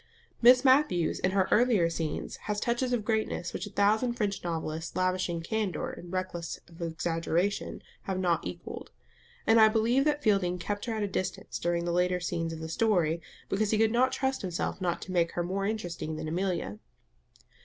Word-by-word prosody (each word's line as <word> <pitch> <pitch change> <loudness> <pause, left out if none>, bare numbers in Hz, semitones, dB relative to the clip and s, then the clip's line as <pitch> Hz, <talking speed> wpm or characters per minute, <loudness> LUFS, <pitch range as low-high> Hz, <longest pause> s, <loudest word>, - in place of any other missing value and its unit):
Miss 250 +2 +7
Matthews 260 - +3
in 185 - +2
her 190 0 +2
earlier 220 -7 +4
scenes 165 -2 -3
has 210 -1 0
touches 240 +3 0
of 235 -4 0
greatness 220 -5 -1
which - - -4
a - - -8
thousand 215 +5 +2
French 210 -5 -2
novelists 165 -1 -3
lavishing 185 -2 0
"candour" 205 -1 -2
and 175 - -10
reckless 185 -2 -3
of 170 0 -14
exaggeration 170 +3 -1 0.2
have 190 -1 -2
not 175 -2 +1
equalled; - - -7 0.6
and 225 0 +6
I 220 - +9
believe 230 +4 +3
that 295 -1 +1
Fielding 195 -5 +2
kept 205 +5 -3
her 235 - -2
at 215 - -1
a - - 0
distance 185 -1 -3
during 170 0 0
the 175 - 0
later 180 +1 +2
scenes 165 -2 -2
of 160 0 -6
the 160 - -4
story, 170 -3 +1 0.3
because 205 +1 0
he 215 - +2
could 220 0 +3
not 255 +3 +3
trust 265 0 -1
himself 180 +1 -3
not 175 -2 -1
to 185 - -8
make 170 -2 +1
her 175 - -1
more 195 +3 -1
interesting 175 -7 -3
than 155 - -5
Amelia. 170 - -2
185 Hz, 185 wpm, -29 LUFS, 170-220 Hz, 0.6 s, I